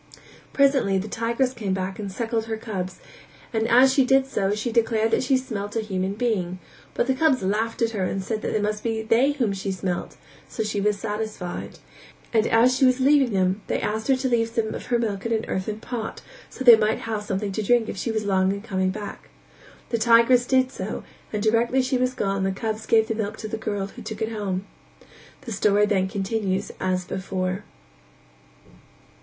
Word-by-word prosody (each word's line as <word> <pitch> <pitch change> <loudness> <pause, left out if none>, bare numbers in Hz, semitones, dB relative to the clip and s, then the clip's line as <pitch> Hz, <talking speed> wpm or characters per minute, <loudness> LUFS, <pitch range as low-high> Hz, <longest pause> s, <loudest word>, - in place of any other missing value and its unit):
Presently 270 -8 +3
the 190 +3 -3
tigress 235 +4 0
came 200 -6 -2
back 190 +1 -4
and 200 -2 -4
suckled 225 +2 -2
her 225 -1 -3
cubs 190 -5 -5 0.5
and 220 0 +1
as 255 +3 +6
she 270 - +4
did 265 +1 +4
so 205 -6 0
she 220 +3 -2
declared 225 -1 +2
that - - +2
she 260 +1 +2
smelt 210 -5 -5
a 225 - +1
human 190 -2 -2
being, 205 -6 -1 0.4
but - - +1
the 265 - +2
cubs 260 -4 +2
laughed 220 +4 0
at 230 - +1
her 205 -4 -2
and 195 +1 -2
said 215 +2 -3
that - - -2
it 210 - +1
must 210 0 -2
be 225 -1 -1
they 245 +6 +3
whom 240 -8 0
she 195 0 -3
smelt; 185 -2 -3 0.3
so 220 - -3
she 210 -1 -2
was 210 0 +1
satisfied, 210 -3 -5 0.6
and 220 -1 +3
as 240 +3 +4
she 270 - +1
was 255 0 +4
leaving 275 -1 +4
them 190 +1 +1
they - - 0
asked 220 +1 -2
her 270 - +4
to 260 +1 -1
leave 230 -2 +1
some 225 -1 -1
of - - -7
her 240 - +2
milk 210 -4 -2
in - - -4
an 220 0 -1
earthern 210 +3 -3
pot 230 -1 -5 0.3
so - - -7
that 245 - +10
they - - +11
might 220 - -1
have 220 -2 -3
something 200 0 -3
to 205 - -2
drink 230 +2 +3
if - - -4
she 195 +4 -2
were 220 - 0
long 190 -2 +2
in 200 - -3
coming 190 -4 0
back. 205 +1 -7 0.6
The 230 - 0
tigress 235 +2 +5
did 260 -1 +3
so - - -5 0.3
and 210 -1 -2
directly 235 +4 +2
she 255 0 0
was 255 0 0
gone 195 -3 -1
the 190 - +1
cubs 215 +2 -4
gave 220 -1 +4
the 225 - -1
milk 220 -1 -3
to 215 - -6
the 215 - -4
girl 205 -3 -3
who 220 +5 -11
took 220 0 -5
it 220 - -2
home. 200 -3 -3 0.8
The 255 -4 -8
story 205 0 +3
then 190 -3 +1
continues 195 -1 -2
as 185 -1 -1
before. 185 +1 -3
220 Hz, 210 wpm, -24 LUFS, 195-235 Hz, 0.8 s, they